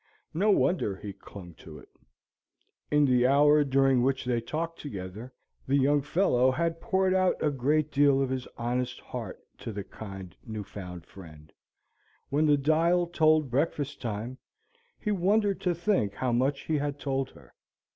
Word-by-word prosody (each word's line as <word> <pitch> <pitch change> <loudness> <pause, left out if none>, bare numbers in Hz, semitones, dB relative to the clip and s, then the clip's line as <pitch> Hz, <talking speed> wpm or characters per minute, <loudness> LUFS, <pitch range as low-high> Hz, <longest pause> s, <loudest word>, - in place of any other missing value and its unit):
No 195 +7 +1
wonder 180 - +2
he 100 +1 -8
clung 90 -4 -12
to - - -11
it. - - -15 1.0
In 150 0 +4
the 125 -2 +3
hour 145 +2 +5
during 135 -2 +3
which 135 +1 0
they 120 -2 0
talked 165 +7 -4
together, 105 -1 -7 0.4
the 135 - +2
young 140 +1 +3
fellow 135 -4 +2
had 165 +4 -1
poured 190 -3 +1
out 185 -1 +3
a 150 - +1
great 145 +3 0
deal 140 -1 +4
of 135 -1 0
his 130 -1 -3
honest 120 +1 -2
heart - - -7 0.2
to - - -6
the 100 -1 -5
kind 95 -4 -9
new 110 -2 -6
found 90 -4 -9
friend; 80 -5 -14 0.8
when 150 +3 +2
the 145 -1 +5
dial 165 +5 +2
told 155 -4 +2
breakfast 145 +1 -1
time, 115 +3 -4 0.6
he 210 - -2
wondered 200 +1 +1
to 180 -2 0
think 170 - 0
how 130 -1 -1
much 135 +4 +1
he 155 -2 -1
had 145 0 -3
told 135 -1 -2
her. 70 -4 -18
135 Hz, 165 wpm, -28 LUFS, 120-155 Hz, 1.0 s, hour